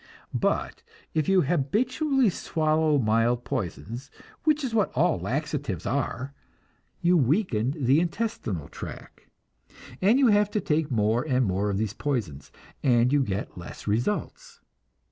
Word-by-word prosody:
But - - -1 0.3
if 155 +2 0
you 190 -1 +5
habitually 235 - +1
swallow 155 -2 +1
mild 115 0 +2
poisons, 115 - -4 0.4
which 305 -1 +3
is 250 -4 -2
what 215 -3 +2
all 165 +4 +2
laxatives 140 - -3
are, 135 0 -2 0.7
you 175 +1 +4
weaken 135 - +1
the 135 +1 +3
intestinal 170 - -2
tract, - - -10 0.7
and 210 +7 +5
you 270 -3 +5
have 205 -1 +4
to 210 - -1
take 160 -4 0
more 110 -1 +2
and 130 -1 +2
more 100 +1 0
of 100 - -1
these 110 -1 -1
poisons, 105 - -3 0.3
and 125 0 +3
you 145 - +4
get 100 -6 -3
less 85 - -9
results. 120 - -2
140 Hz, 135 wpm, -26 LUFS, 115-180 Hz, 0.7 s, you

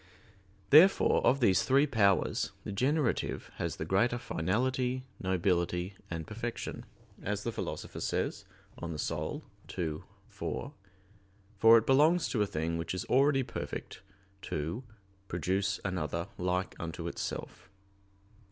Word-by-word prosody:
Therefore, 165 +7 +6
of 140 +1 +3
these 95 -6 +5
three 135 +2 +4
powers, 105 -9 +2
the - - -5
generative 130 +5 0
has - - -2
the 80 - -4
greater 105 +8 +2
finality, 125 +6 -1
nobility, 90 0 0 0.2
and 80 -2 -4
perfection, 115 +2 -5 0.3
as 105 0 -2
the 115 - -1
Philosopher - - -5
says - - -2 0.4
(De - - -10
Anima 80 -3 -3 0.4
ii, 80 -3 -2 0.3
4), - - -5 0.8
for 115 +3 +8
it 115 - +1
belongs 155 +6 +4
to 110 - 0
a 105 - +2
thing 85 -1 -2
which 85 - -3
is 95 - -3
already 135 +1 +4
perfect - - -6 0.4
to 85 - -3 0.4
"produce 95 +3 0
another 85 -2 -2
like 90 +1 -1
unto 85 -2 -5
itself." - - -5
100 Hz, 125 wpm, -31 LUFS, 90-125 Hz, 0.8 s, for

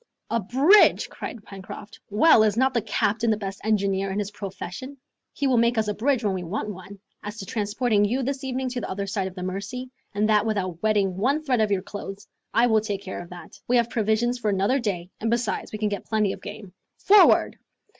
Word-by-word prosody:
"A 230 - +2
bridge!" 270 - +5
cried 225 - -7
Pencroft. 200 +2 -10
"Well, 220 +5 +5
is 215 0 +2
not 260 +1 +3
the 235 - +1
captain 225 +2 0
the 215 - +2
best 195 -2 -6
engineer 195 -2 +1
in 190 - -3
his 205 -1 -2
profession? 200 +7 -7 0.3
He 285 - -3
will 255 -3 +3
make 235 +1 +2
us 220 -1 +1
a 210 - 0
bridge 250 +2 0
when 205 -2 +1
we 185 - -3
want 210 +5 -4
one. 185 +2 -11 0.2
As 210 +2 -7
to 200 - -6
transporting 210 +1 0
you 245 +6 0
this 275 +2 -3
evening 260 0 -2
to 245 0 -4
the - - -5
other 200 +1 -3
side 195 -1 -2
of 190 - -9
the 180 - -6
Mercy, 200 +8 -5 0.2
and 210 +1 +2
that 210 -1 +4
without 185 -6 -2
wetting 205 -4 +1
one 275 +9 +1
thread 255 -6 +1
of 215 - +2
your 195 -2 0
clothes, 200 0 -8 0.2
I 235 - +4
will 220 -2 +3
take 205 -2 -4
care 190 - -6
of 175 - -11
that. 180 -1 -12
We 245 - +3
have 235 0 +1
provisions 230 +3 +1
for 215 - 0
another 200 +7 +1
day, 190 -6 -3
and 225 - -1
besides 235 -1 -1
we 215 - -4
can 210 0 0
get 205 - -4
plenty 210 -3 +1
of - - -11
game. 205 -3 -9 0.2
Forward!" 410 +1 +5
215 Hz, 225 wpm, -25 LUFS, 195-240 Hz, 0.3 s, bridge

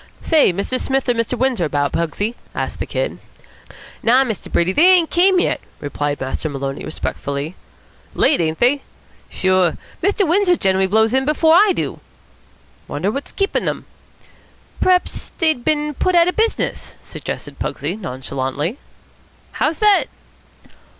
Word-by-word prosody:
"Say, 315 - +4
Mr. 200 +8 -2
Smith 270 0 -1
or - - +4
Mr. 230 +1 -2
Windsor 250 -8 +1
about, 145 -2 0
Pugsy?" 200 +7 -2 0.2
asked - - -3
the - - -3
Kid. - - -3 0.8
"Naw, 250 +3 +4
Mr. 220 -6 -5
Brady, 170 +2 +2
they 350 - +6
ain't 335 -3 +1
came 370 +1 +4
yet," - - 0 0.2
replied 145 0 -3
Master 135 +4 -3
Maloney 135 -1 -4
respectfully. 140 +4 -4 0.6
"Late, 295 - +3
ain't 160 -1 -1
they?" 265 +4 +2 0.5
"Sure. 185 -2 +2 0.2
Mr. 400 +1 +1
Windsor 360 +2 +3
generally 190 0 +2
blows 220 +3 +2
in 265 0 +3
before 310 +3 +3
I 395 +4 +6
do." - - -3 0.9
"Wonder 170 +8 -2
what's 275 +4 -5
keepin' 395 0 -1
them." - - -3 1.0
"P'raps, 365 -1 +1
dey've 315 -7 +1
bin 300 +1 0
put 365 +6 0
out 340 0 +6
of 360 - 0
business," 450 +1 -1
suggested - - -7
Pugsy - - -3
nonchalantly. 140 - -4 0.7
"How's 310 +1 -1
that?" 420 -2 +4
245 Hz, 145 wpm, -19 LUFS, -, 1.0 s, they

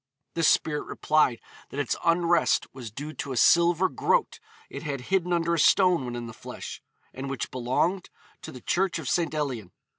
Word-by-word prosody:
The 165 - -2
spirit 155 -2 +2
replied 150 -6 +1 0.3
that 140 - -6
its 145 - 0
unrest 170 0 +3
was 125 -4 -8
due 145 +8 -7
to 140 -4 -5
a - - -4
silver 170 +6 +5
groat - - 0 0.3
it - - -8
had 145 -4 -4
hidden 180 -2 +2
under 170 -1 +1
a 170 - +1
stone 180 -3 +4
when 120 -1 -5
in 120 0 -5
the 115 - -8
flesh, - - -8 0.3
and 135 +1 -6
which 135 - -4
belonged 130 +9 -1 0.3
to - - -8
the 125 - -11
church 185 -1 0
of 160 -5 -6
St. 170 +3 +1
Elian. 125 -11 -3
155 Hz, 185 wpm, -26 LUFS, 130-170 Hz, 0.3 s, silver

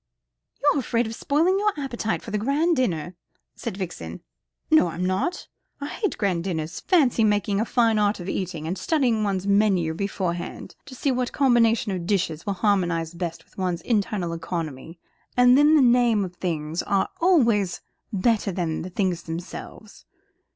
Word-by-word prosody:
"You're 290 0 +4
afraid 235 -1 0
of 220 - -5
spoiling 330 - +1
your 420 0 +2
appetite 240 -5 -3
for 225 - -8
the 210 - 0
grand 295 +9 +1
dinner," 180 - -1 0.4
said 220 -5 -5
Vixen. 185 -3 -6 0.5
"No, 310 - +6
I'm 170 +2 -3
not. 190 - -1 0.3
I 285 - -4
hate 410 -5 -2
grand 185 -5 0
dinners. 165 -2 -3
Fancy 280 - +3
making 205 -1 +1
a - - 0
fine 230 -3 +2
art 205 0 +1
of 175 - -7
eating, 180 -5 -3
and 180 +3 -3
studying 245 - +1
one's 195 -2 -1
menu 200 -5 +2
beforehand 180 -1 -4
to 260 - -10
see 275 +2 0
what 250 -1 -1
combination 235 -5 +3
of 180 -3 -4
dishes 175 -4 -1
will 200 - +1
harmonise 175 -5 0
best 170 -1 -5
with - - -16
one's 180 -2 -1
internal 200 -5 -1
economy. 165 -2 -5 0.4
And 245 0 +7
then 295 +3 +6
the 295 - +5
names 240 -4 +4
of 180 - -7
the 180 - -32
things 160 -1 -2
are 195 -1 +1
always 235 - +3 0.3
better 205 0 +1
than 170 -3 -2
the 180 - -6
things 180 -2 -1
themselves. 170 +5 -8
200 Hz, 170 wpm, -24 LUFS, 175-245 Hz, 0.5 s, And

